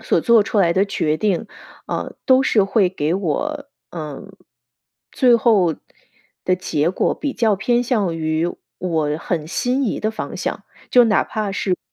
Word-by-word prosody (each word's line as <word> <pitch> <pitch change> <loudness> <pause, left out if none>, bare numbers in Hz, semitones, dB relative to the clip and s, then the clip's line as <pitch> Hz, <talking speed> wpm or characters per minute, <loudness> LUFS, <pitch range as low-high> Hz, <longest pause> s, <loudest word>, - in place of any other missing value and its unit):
所 - - +1
做 235 -3 +5
出 205 - -2
来 170 -4 +4
的 190 +3 +2
决 155 -6 -1
定， 205 +3 -1 0.4
呃， - - -4
都 260 0 +5
是 215 -6 +3
会 195 -1 +2
给 165 -3 -1
我， 280 - -2 0.2
呃， 155 -5 -7 0.9
最 245 -2 +4
后 205 -8 +3 0.7
的 185 - +2
结 165 -3 0
果 185 - 0
比 285 -2 -3
较 225 -4 +2
偏 240 +5 +1
向 215 -8 0
于 160 +1 0 0.3
我 160 -4 -1
很 165 -3 -3
心 250 - -1
仪 225 - -2
的 215 - 0
方 220 - -6
向。 - - -4 0.3
就 245 -1 +6
哪 220 -2 +3
怕 210 -2 -3
是 195 -1 -1
不 - - -24
195 Hz, 180 characters per minute, -20 LUFS, 170-235 Hz, 0.9 s, 就